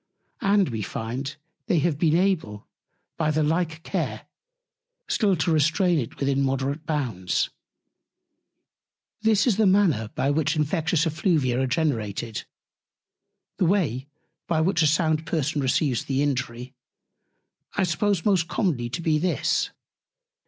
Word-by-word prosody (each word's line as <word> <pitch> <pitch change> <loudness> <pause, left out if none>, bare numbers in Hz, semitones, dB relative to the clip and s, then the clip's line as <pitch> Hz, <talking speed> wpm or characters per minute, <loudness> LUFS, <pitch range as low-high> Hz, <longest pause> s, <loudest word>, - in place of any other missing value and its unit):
And 200 -3 +3
we 110 -3 -3
find, 120 +8 -4 0.3
they 190 -6 +2
have 155 -2 +1
been 160 -2 +3
able, 165 - 0 0.5
by 155 -2 +1
the 155 0 +1
like 160 +1 -1
Care, - - -3 0.8
still 200 -4 +2
to 165 +1 0
restrain 165 +3 +3
it 115 - -5
within 140 0 +1
moderate 135 +3 -1
Bounds. 125 - -1 1.7
This 220 -2 +3
is 230 -6 +2
the 220 -2 +4
Manner 185 - +3
by 140 - +1
which 155 +1 +1
Infectious 155 +2 +1
Effluvia 155 -6 +1
are 130 - +1
generated; 115 - -2 1.1
The 185 - +2
Way, 155 - +1 0.4
by 165 -2 +1
which 170 +1 +2
a 155 - +5
sound 155 0 +1
Person 150 -2 -1
receives 130 -1 +1
the 135 +1 0
Injury, 130 -2 -3 1.0
I 200 - +2
suppose 185 +1 0
most 190 -5 +3
commonly 155 - -1
to 125 +8 -4
be 155 -2 +2
this. 175 +2 0
155 Hz, 130 wpm, -25 LUFS, 135-175 Hz, 1.7 s, a